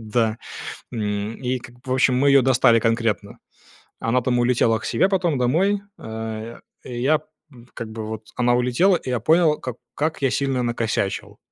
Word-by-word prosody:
Да. 110 0 0 0.6
М, 105 0 -2
и 125 +1 0
как 120 0 -13
бы, - - -23
в 130 - -1
общем, 130 0 +3
мы - - +5
ее 135 -1 +6
достали 120 -3 +4
конкретно. 115 -2 -1 0.6
Она, 120 +3 +1
там, 125 0 +1
улетела 120 -2 +2
к - - -9
себе 120 +10 +2
потом 175 -7 +1
домой. 185 +12 +2 0.2
А 110 +1 -6 0.2
я 130 +5 +1 0.5
как 115 -1 -6
бы 110 -1 -6
вот 110 0 -6
она 120 0 +2
улетела, 125 +10 +3
и 130 - -8
я 125 - 0
понял, 160 -1 +3
как 125 -2 -5 0.2
как 155 0 -1
я 135 - +3
сильно 135 -3 0
накосячил. 115 -4 -2
120 Hz, 170 wpm, -22 LUFS, 115-135 Hz, 0.6 s, ее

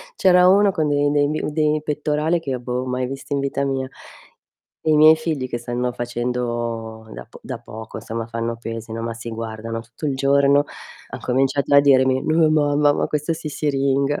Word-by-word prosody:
C'era 180 - +5
uno 200 +1 +5
con 155 -4 0
i 145 0 +2
dei 145 -1 +2
mhmm, 155 +1 -2
i - - -4
dei 155 -1 +1
pettorali 150 +2 0
che 135 -5 -4
boh, 125 +1 -3
mai 125 0 -2
visti 135 +2 -6
in 140 - 0
vita 140 0 -1
mia. 135 -1 -2 1.0
E 155 - +1
i - - +4
miei 155 +1 +8
figli 155 -5 -3
che 120 - -3
stanno 120 +1 -3
facendo 120 -2 -3
da - - -9
po - - -14
da - - -6
poco, 110 +1 -9
insomma, 115 0 -5
fanno 115 0 -3
pesi, 115 -1 -7
no, 115 0 -4
ma 115 0 -3
si 115 +1 -8
guardano 115 0 -5
tutto 115 +6 -8
il 140 - 0
giorno, 140 +1 +3 0.5
han - - -7
cominciato 135 +2 +1
a 140 - +9
dirmi: 130 -2 +3
"No 155 0 +3
mamma, 145 -1 +3
ma - - 0
questo 150 +2 -1
si 155 - -6
siringa." 140 -1 0
135 Hz, 200 wpm, -21 LUFS, 120-150 Hz, 1.0 s, a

